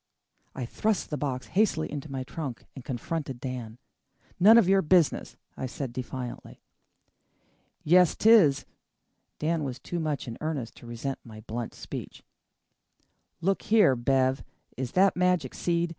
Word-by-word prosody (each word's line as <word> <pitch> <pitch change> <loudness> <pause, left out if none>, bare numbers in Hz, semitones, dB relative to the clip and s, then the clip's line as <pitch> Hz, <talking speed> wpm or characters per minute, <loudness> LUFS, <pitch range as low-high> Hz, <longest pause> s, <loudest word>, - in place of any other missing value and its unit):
I 130 - -3
thrust 210 - -1
the 150 - -1
box 130 -3 -3
hastily 190 -6 +1
into 145 0 -6
my 135 -1 -3
trunk 135 -2 -6
and 130 - -10
confronted 135 +1 -4
Dan. 125 -3 -6 0.6
"None 215 +5 +8
of 225 -6 +5
your 195 0 +5
business," 170 -1 +2 0.2
I 130 - -4
said 130 -1 -5
defiantly. 125 0 -7 1.2
"Yes, 180 +2 +5
'tis." 205 -11 +5 0.7
Dan 160 0 0
was 130 -3 -4
too 170 +7 -5
much 155 -4 -2
in 115 - -7
earnest 150 -7 -3
to 120 - -13
resent 120 +4 -4
my 110 -2 -11
blunt 115 +2 -5
speech. - - -8 1.2
"Look 195 +3 +1
here, 210 -12 +4
Bev, 130 +2 +1 0.3
is 130 -2 -4
that 190 +1 +4
magic 180 -2 +1
seed? 170 0 0
140 Hz, 145 wpm, -28 LUFS, 125-175 Hz, 1.2 s, None